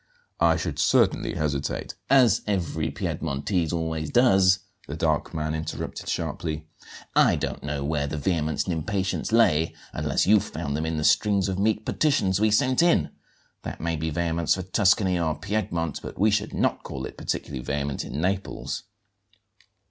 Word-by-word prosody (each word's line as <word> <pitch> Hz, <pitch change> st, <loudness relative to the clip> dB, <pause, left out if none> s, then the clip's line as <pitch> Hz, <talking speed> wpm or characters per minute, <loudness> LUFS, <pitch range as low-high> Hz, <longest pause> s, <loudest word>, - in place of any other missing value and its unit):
I -, -, +4 dB
should -, -, -4 dB
certainly 120 Hz, -7 st, +2 dB
hesitate 75 Hz, -2 st, -2 dB
" -, -, -43 dB
"As 115 Hz, -2 st, +3 dB
every 95 Hz, -6 st, -1 dB
Piedmontese 80 Hz, +3 st, -2 dB
always 80 Hz, -2 st, -2 dB
does," 95 Hz, -6 st, +4 dB, 0.3 s
the -, -, -5 dB
dark -, -, 0 dB
man 80 Hz, -1 st, -2 dB
interrupted 80 Hz, 0 st, -5 dB
sharply. 80 Hz, -1 st, -3 dB, 0.5 s
"I -, -, +5 dB
don't -, -, -3 dB
know 70 Hz, -1 st, -3 dB
where 70 Hz, 0 st, -1 dB
the 75 Hz, -, -4 dB
vehemence 80 Hz, -1 st, 0 dB
and 90 Hz, -, -2 dB
impatience 95 Hz, +5 st, -2 dB
lay, 80 Hz, -9 st, +3 dB, 0.2 s
unless -, -, 0 dB
you 105 Hz, +2 st, +6 dB
found 70 Hz, -6 st, -4 dB
them 80 Hz, +2 st, -2 dB
in 80 Hz, 0 st, -2 dB
the 75 Hz, -, -1 dB
strings 100 Hz, +3 st, +3 dB
of 95 Hz, -1 st, -2 dB
meek 110 Hz, +1 st, +1 dB
petitions 100 Hz, -11 st, +1 dB
we 110 Hz, -, +4 dB
sent 130 Hz, +6 st, +3 dB
in. 170 Hz, 0 st, +3 dB, 0.5 s
That -, -, -6 dB
may 85 Hz, 0 st, -1 dB
be 80 Hz, +1 st, -2 dB
vehemence 85 Hz, 0 st, 0 dB
for 95 Hz, -, -4 dB
Tuscany 95 Hz, -1 st, +2 dB
or 80 Hz, -3 st, 0 dB
Piedmont, 85 Hz, -5 st, -2 dB
but -, -, -8 dB
we 105 Hz, +4 st, +3 dB
should 105 Hz, +1 st, 0 dB
not -, -, +1 dB
call -, -, -6 dB
it -, -, -8 dB
particularly 65 Hz, -4 st, -4 dB
vehement 70 Hz, +1 st, -2 dB
in 70 Hz, -, -5 dB
Naples." 95 Hz, +3 st, -2 dB
85 Hz, 165 wpm, -25 LUFS, 75-100 Hz, 0.5 s, you